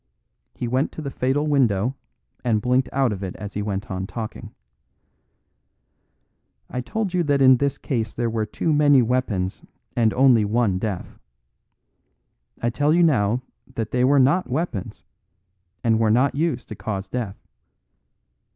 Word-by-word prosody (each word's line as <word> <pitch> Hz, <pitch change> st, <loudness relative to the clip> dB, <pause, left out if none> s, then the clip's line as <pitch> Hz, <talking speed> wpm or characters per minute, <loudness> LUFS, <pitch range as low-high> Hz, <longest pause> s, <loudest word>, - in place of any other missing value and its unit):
He 120 Hz, -, -3 dB
went 130 Hz, +4 st, 0 dB
to -, -, -7 dB
the 140 Hz, -, -4 dB
fatal 135 Hz, +4 st, 0 dB
window, 130 Hz, -5 st, +2 dB, 0.5 s
and 115 Hz, -3 st, +2 dB
blinked 125 Hz, +3 st, +1 dB
out 135 Hz, -3 st, +1 dB
of 100 Hz, -2 st, -5 dB
it 95 Hz, -, -5 dB
as 105 Hz, -1 st, -7 dB
he 105 Hz, -, -2 dB
went 100 Hz, -1 st, -4 dB
on 95 Hz, 0 st, -3 dB
talking. 110 Hz, 0 st, -7 dB, 2.2 s
"I 125 Hz, -, -2 dB
told 210 Hz, -, -3 dB
you 180 Hz, -, +2 dB
that 145 Hz, -1 st, +2 dB
in 130 Hz, -1 st, +7 dB
this 140 Hz, +1 st, -1 dB
case 115 Hz, -6 st, -2 dB
there 120 Hz, 0 st, -1 dB
were 110 Hz, -1 st, -1 dB
too 155 Hz, +9 st, -1 dB
many 145 Hz, -3 st, +5 dB
weapons 110 Hz, -6 st, -1 dB, 0.3 s
and 115 Hz, -2 st, +3 dB
only 125 Hz, -4 st, +5 dB
one 105 Hz, -3 st, +1 dB
death. 100 Hz, -3 st, -5 dB, 1.4 s
I 120 Hz, -, +1 dB
tell 145 Hz, +5 st, +2 dB
you 175 Hz, -, +4 dB
now 125 Hz, -5 st, +2 dB, 0.3 s
that 115 Hz, -3 st, -3 dB
they 125 Hz, 0 st, +1 dB
were 140 Hz, +3 st, +4 dB
not 140 Hz, +8 st, +3 dB
weapons, 130 Hz, -, -3 dB, 0.8 s
and 115 Hz, -1 st, +3 dB
were 110 Hz, -1 st, +3 dB
not 125 Hz, +5 st, +3 dB
used 145 Hz, -5 st, -1 dB
to 110 Hz, -, -6 dB
cause 100 Hz, -2 st, -4 dB
death. 110 Hz, -3 st, -4 dB
125 Hz, 155 wpm, -23 LUFS, 110-140 Hz, 2.2 s, in